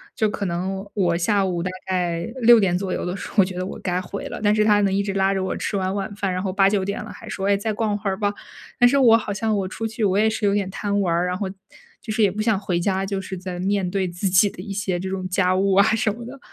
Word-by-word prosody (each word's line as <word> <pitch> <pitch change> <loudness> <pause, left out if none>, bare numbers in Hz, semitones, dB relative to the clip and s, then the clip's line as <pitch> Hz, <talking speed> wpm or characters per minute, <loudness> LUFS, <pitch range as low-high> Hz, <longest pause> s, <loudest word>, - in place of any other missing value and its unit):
就 220 - +2
可 205 -1 -3
能 190 +3 -3
我 180 -4 +2
下 200 +2 +2
午 175 -2 -1
大 185 - -2 0.2
概 175 -2 -1 0.2
6 235 0 +8
点 190 -4 +2
左 190 0 -3
右 - - -3
的 180 - -3
时 - - -7
候， - - -14
我 195 - +7
觉 185 - -6
得 180 - -2
我 - - -6
该 180 -1 -1
回 200 +2 -6
了， - - -6
但 205 - +4
是 215 - +3
他 210 -1 +4
能 195 - +2
一 200 - +1
直 200 -1 -3
拉 195 0 +2
着 190 - -1
我 190 - -2
吃 200 - -2
完 190 0 -1
晚 200 0 -3
饭， 195 -2 -2
然 185 - -2
后 190 - -1
8-9 195 +1 +3
点 200 +1 -3
了 - - -9
还 - - -11
说， 195 - -3
哎， 200 - +4
再 215 +2 -2
逛 210 -1 -1
会 205 -1 -3
儿 190 - -2
吧。 205 -1 0 0.5
但 245 - +7
是 280 - +2
我 240 -5 +6
好 215 - -4
像 220 +1 0
我 190 -2 -1
出 225 - -5
去 220 0 -4
我 195 -1 +2
也 215 - +4
是 220 0 -4
有 200 - +2
点 195 -2 -1
贪 205 +1 -1
玩 175 -4 +1
儿， 175 +1 +1
然 180 0 -2
后 200 - -2 0.5
就 215 - -5
是 215 0 +2
也 195 - +4
不 215 - -3
想 220 -2 +2
回 180 -4 -1
家， 190 +2 0
就 195 0 -2
是 190 0 -6
再 180 -1 -6
面 195 0 0
对 195 -1 0
自 175 +3 -3
己 190 +3 +5
的 180 - -10
一 200 - -7
些 190 -2 -2
这 190 - -4
种 190 -1 -3
家 185 0 +2
务 195 0 +2
啊 200 - +7
什 215 -1 +1
么 235 +2 -9
的， 265 +3 -10
195 Hz, 325 characters per minute, -22 LUFS, 185-205 Hz, 0.5 s, 6